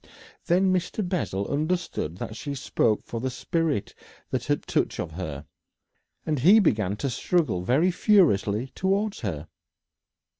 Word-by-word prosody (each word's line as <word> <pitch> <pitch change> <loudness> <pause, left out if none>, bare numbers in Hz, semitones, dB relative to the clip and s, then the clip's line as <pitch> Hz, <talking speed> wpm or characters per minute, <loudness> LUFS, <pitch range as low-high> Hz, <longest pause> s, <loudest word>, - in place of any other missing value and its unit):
Then 185 +2 +3
Mr. 185 +2 -1
Bessel 100 - -2
understood 155 - -2
that 110 - -6
she 140 +4 -5
spoke 115 -5 0
for 115 - -5
the 130 +3 -2
spirit 155 - -1 0.4
that - - -2
had - - 0
touch - - -1
of 85 - -3
her, 80 -4 -6 0.8
and 155 -3 0
he 185 - +7
began 105 - +1
to 135 +6 -2
struggle 150 - 0
very 140 - +2
furiously 130 - +3
towards 195 +2 0
her. 80 - -4
140 Hz, 140 wpm, -26 LUFS, -, 0.8 s, he